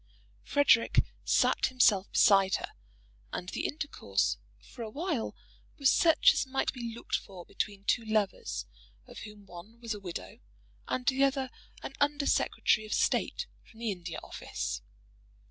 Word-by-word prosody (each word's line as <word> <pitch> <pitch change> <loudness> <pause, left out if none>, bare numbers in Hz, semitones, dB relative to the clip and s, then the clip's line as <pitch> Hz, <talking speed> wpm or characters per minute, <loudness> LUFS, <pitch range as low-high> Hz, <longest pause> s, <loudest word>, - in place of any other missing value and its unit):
"Frederic" 285 -5 +4 0.2
sat - - +3
himself 215 -7 +3
beside 195 -2 +5
her, - - -4 0.6
and 180 - -4
the - - -2
intercourse 295 0 -1 0.2
for 245 - -13
awhile 275 - -3 0.4
was 275 -3 +4
such 325 -2 +5
as - - -1
might 270 0 0
be 240 -3 -5
looked 235 - -11
for 185 -3 -6
between 200 -1 -4
two 235 +3 +1
lovers 215 -3 -1 0.4
of - - -11
whom 210 -1 -11
one 195 +6 -12
was 230 -2 -3
a 210 - -7
widow, 180 -4 -7 0.5
and 250 - -2
the 270 +1 +3
other 270 -2 +1 0.3
an - - -6
Under 290 0 +2
Secretary 215 - +2
of 215 - -2
State - - +1 0.2
from 225 - -18
the 230 -2 -1
India 180 -3 -6
Office. - - -4
225 Hz, 145 wpm, -30 LUFS, 200-270 Hz, 0.6 s, beside